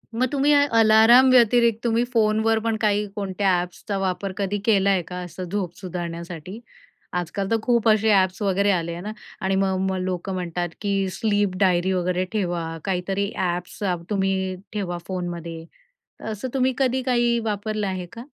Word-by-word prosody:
मग 255 +3 +2
तुम्ही 285 +1 +2
अला 285 0 +4
अलाराम 225 +4 +7
व्यतिरिक्त 235 -2 +4
तुम्ही 235 0 +2
फोनवर 220 0 +2
पण 225 0 -1
काही 210 -1 +2
कोणत्या 195 -1 -1
ॲप्सचा 180 +3 -5
वापर 190 0 -2
कधी 200 0 -1
केला 200 -4 +3
आहे 190 -2 +3
का? 180 +2 -8
असं 175 +1 -7
झोप 185 -4 -3
सुधारण्यासाठी 175 +1 -6 0.5
आजकाल 180 +3 -2
तर, 225 - +4
खूप 235 -1 +1
असे 220 0 +3
ॲप्स 190 -1 +2
वगैरे 200 0 +2
आले 170 -2 -1
आहे 170 +1 -6
ना, 210 +3 -5 0.3
आणि 190 0 0
मग 190 -1 +1
मग 190 - -1
लोकं 185 +1 -3
म्हणतात 175 -1 -3
की 200 -1 0 0.2
स्लीप 205 -3 0
डायरी 185 -1 +2
वगैरे 180 0 0
ठेवा. 175 -5 -2
काहीतरी 195 +2 -1
ॲप्स 180 +1 -3 0.3
तुम्ही 190 -2 0 0.2
ठेवा 180 -4 -3
फोनमध्ये 170 -3 -5 0.6
तर - - -11
असं 215 +5 -5
तुम्ही 260 -1 +2
कधी 260 -1 +1
काही 240 -2 +2
वापरलं 210 0 -2
आहे 185 -2 -3
का? 230 - -8
195 Hz, 165 wpm, -23 LUFS, 180-220 Hz, 0.6 s, अलाराम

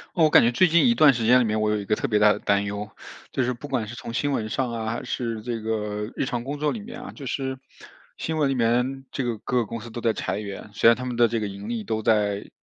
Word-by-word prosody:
我 160 -3 +5
感 - - +7
觉 120 - +3
最 155 +10 +4
近 170 +8 +4
一 235 - +4
段 150 -8 +7
时 120 -2 -2
间 125 +3 +6
里 125 - +3
面， 110 0 0
我 110 - +2
有 105 - +1
一 100 - -5
个 105 - +1
特 - - -2
别 105 -2 +2
大 105 0 +6
的 - - -6
担 100 0 +1
忧， 100 +1 -4 0.4
就 130 - 0
是 125 +1 0
不 125 +4 -9
管 125 -6 -1
是 120 - -8
从 120 - -7
新 145 +4 0
闻 110 -5 -1
上 125 +1 -1
啊， 115 -1 -4
还 115 - -4
是 115 -3 -3
这 120 -1 -3
个 105 -1 -3
日 - - -1
常 120 -2 -3
工 140 +3 -4
作 150 0 +1
里 230 - -4
面 215 +4 -9
啊， 250 +1 -8
就 140 - -10
是 130 0 -3 0.6
新 160 0 -3
闻 145 -3 +2
里 135 - 0
面， 125 +3 +1
这 135 - -2
个 120 -2 -2
各 125 - -2
个 120 - +2
公 115 - -5
司 115 +1 -10
都 120 - -6
在 115 - +2
裁 - - -3
员， 105 0 -7
虽 100 - +3
然 115 - +5
他 125 - -5
们 125 -1 -3
的 120 0 +5
这 115 0 -1
个 105 - -2
盈 100 +2 -8
利 115 -2 -3
都 110 +1 -2
在 105 -2 +1
115 Hz, 330 characters per minute, -24 LUFS, 110-130 Hz, 0.6 s, 感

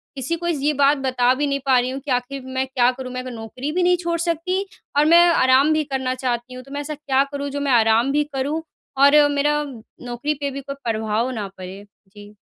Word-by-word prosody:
किसी 270 +5 -2
को 345 +1 -5
ये 300 -3 0
बात 285 +1 +3
बता 255 -2 +2
भी 290 +2 -1
नहीं 280 0 -1
पा 265 -2 +4
रही 245 +1 -1
हूँ 265 +1 -4
कि 285 - -3
आख़िर 250 +2 -2
मैं 260 0 -2
क्या 250 -2 +2
करूँ? 255 0 -8
मैं 255 - -3
अब - - -8
नौकरी 235 +5 -6
भी 360 +3 0
नहीं 360 0 +3
छोड़ 340 -1 -2
सकती, 345 +3 -1 0.3
और 295 - +5
मैं 340 +2 +7
आराम 275 -1 +4
भी 310 0 +1
करना 265 -3 -2
चाहती 250 -1 -3
हूँ 255 0 -9
तो 275 - -16
मैं 285 +1 -3
ऐसा 300 +1 -5
क्या 275 -2 +1
करूँम, 285 0 -4
जो 285 +1 -4
मैं 285 -1 -1
आराम 230 +2 +3
भी 295 +1 +2
करूँ 285 +4 -1 0.4
और 285 +2 +6
मेरा 295 +1 +1 0.4
नौकरी 245 +5 -2
पे 285 -1 -4
भी 275 +1 -6
कोई 275 +1 -7 0.2
प्रभाव 220 +2 -1
ना 210 -3 -4
पड़े? 190 +2 -9 0.2
जी। 205 +1 -14
275 Hz, 235 wpm, -21 LUFS, 250-295 Hz, 0.4 s, मैं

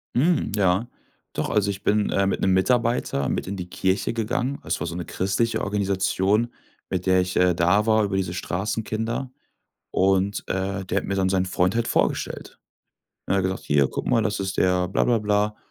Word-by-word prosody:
Mhm. 155 - +2
Ja, 100 +3 +2 0.5
doch, - - -2
also, 100 -1 +1
ich 95 0 -4
bin, 105 0 +2
äh, 100 0 +2
mit 95 - -1
'nem 95 - +3
Mitarbeiter 115 - +1
mit - - -2
in 100 - -3
die 90 0 -6
Kirche 95 +5 0
gegangen. 120 +4 -2
Es - - -2
war 85 - -3
so 85 - -5
’ne 90 - -4
christliche 100 +5 -1
Organisation, 100 +2 +1 0.4
mit 90 -1 -2
der 95 0 +4
ich, 90 0 -3
äh, 90 -1 +4
da 90 +6 +3
war 110 -1 +3
über 95 -1 -1
diese 90 -2 -2
Straßenkinder 110 +7 -3 0.6
und, 95 +1 +1
äh, 95 0 -2
der - - -2
hat - - -9
mir 100 - -2
dann 95 -1 +1
sein 95 -1 +1
Freund 90 +2 +1
halt 115 0 0
vorgestellt. - - -1 0.7
Er 100 - +1
hat 95 - +2
gesagt: 95 0 -2
„Hier 70 -2 +3
guck - - -5
mal, 115 -3 +3
das 105 -2 -1
ist 95 0 -3
der 90 -1 +2
Bla - - +1
bla 120 -2 +3
bla 105 0 0
100 Hz, 200 wpm, -24 LUFS, 95-110 Hz, 0.7 s, der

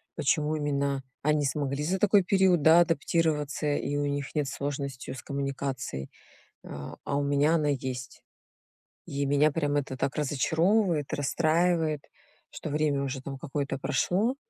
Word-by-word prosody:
почему 150 +2 +1
именно 140 -2 -1 0.2
они 150 -1 +2
смогли 140 0 -1
за 185 +5 0
такой 205 -1 +5
период, 190 -3 +3
да, 160 +2 +7
адаптироваться 155 -2 0
и 145 0 -2
у 145 - 0
них 140 -1 -3
нет 150 -2 +1
сложности 140 -1 -4
с 130 - -8
коммуникацией, 135 - -4 0.5
а 70 -1 -8
а, 140 - -1
у 145 - +1
меня 145 +3 +3
она 150 -3 +1
есть. 130 -2 -4 0.8
И 140 0 -2
меня 145 +2 +4
прям 145 -2 0
это 135 -2 -2
так 135 - -1
разочаровывает, 160 - +1
расстраивает, 160 +1 +1 0.5
что 155 - -6
время 150 -2 +1
уже 135 -1 -3
там 135 0 -6
какое-то 140 0 -3
прошло, 180 - +1
145 Hz, 145 wpm, -28 LUFS, 140-160 Hz, 0.8 s, да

